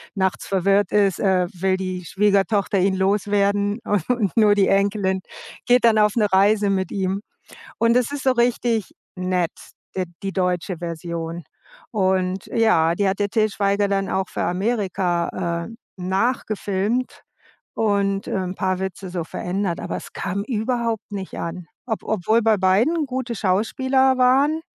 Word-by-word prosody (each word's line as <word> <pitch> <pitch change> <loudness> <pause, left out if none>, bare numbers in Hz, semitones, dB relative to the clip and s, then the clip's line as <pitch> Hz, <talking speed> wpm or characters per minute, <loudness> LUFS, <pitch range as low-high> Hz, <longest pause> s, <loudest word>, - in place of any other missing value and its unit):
nachts 190 -2 -1
verwirrt 195 +1 +2
ist, 200 -3 +2
äh, 185 -2 +2
will 190 +1 0
die 185 -1 -4
Schwiegertochter 200 +1 +1
ihn 190 +1 +2
loswerden 200 +1 +1
und 205 -1 0
nur 210 -2 +5
die 200 -2 +3
Enkelin 195 -1 +1 0.5
geht 245 -1 +5
dann 220 -2 +5
auf 210 -1 +3
'ne 215 -3 +3
Reise 205 +1 +4
mit 190 -1 -1
ihm. 195 0 -1 0.6
Und 230 +1 +3
das 250 +1 +1
ist 285 - -4
so 265 - +4
richtig 235 -3 0 0.2
nett, 180 -2 -1 0.4
der 185 - -1 0.2
die 195 - -2
deutsche 180 -1 -1
Version. 170 0 -5 0.5
Und 190 -2 0
ja, 170 -8 +3
die 200 0 +1
hat 195 - -3
der 205 - +1
Til 215 +1 +2
Schweiger 200 0 0
dann 195 -1 0
auch 190 0 -1
für - - -3
Amerika, 180 -4 -1
äh, 230 - -11 0.3
nachgefilmt 210 +3 -1 0.5
und, 200 -2 0
ähm, 185 -1 -2
paar 185 -1 -1
Witze 190 0 -5
so 175 -2 -3
verändert. 180 +1 -3
Aber - - -4
es - - -10
kam 200 +2 -3
überhaupt 230 -2 -2
nicht 195 -2 -6
an, 170 +1 -5 0.2
ob 220 - -3
obwohl 220 +2 +1
bei 220 -1 +4
beiden 230 - +2
gute 255 -3 -4
Schauspieler 260 +7 +2
waren, 275 +5 +3
200 Hz, 150 wpm, -22 LUFS, 185-220 Hz, 0.6 s, nur